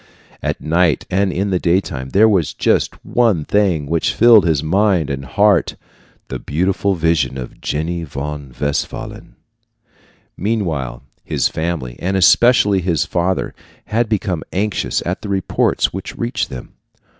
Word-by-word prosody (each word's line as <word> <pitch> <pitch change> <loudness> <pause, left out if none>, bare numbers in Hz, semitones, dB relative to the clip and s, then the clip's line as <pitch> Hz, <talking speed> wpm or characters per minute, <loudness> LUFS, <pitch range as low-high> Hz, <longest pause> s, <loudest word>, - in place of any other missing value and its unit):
At - - -2
night 85 0 +1
and 95 +1 +1
in 100 +3 -1
the 90 - +1
daytime 85 -7 -1
there 105 +9 +5
was 90 -9 +1
just - - +1
one 110 -11 +1
thing 95 -8 +1
which 80 +2 0
filled 115 -6 +6
his 80 -3 +1
mind 90 -2 +1
and 70 0 -4
heart 100 +10 +2 0.5
the - - -4
beautiful 95 +5 0
vision 75 -6 0
of 65 -2 -8
Jenny 85 +3 -2
von 75 -1 -6
Westphalen. 70 -1 -4 1.0
Meanwhile 80 - -2 0.2
his - - 0
family, 80 -7 -3
and 95 +2 -1
especially 105 0 +4
his 85 -4 0
father, 90 +2 -1 0.3
had 115 +1 0
become 100 -6 -1
anxious 105 +2 -1
at - - -3
the 105 - -7
reports 95 -1 0
which - - -7
reached 120 +3 -2
them. 65 -2 -9
90 Hz, 140 wpm, -18 LUFS, 75-100 Hz, 1.0 s, filled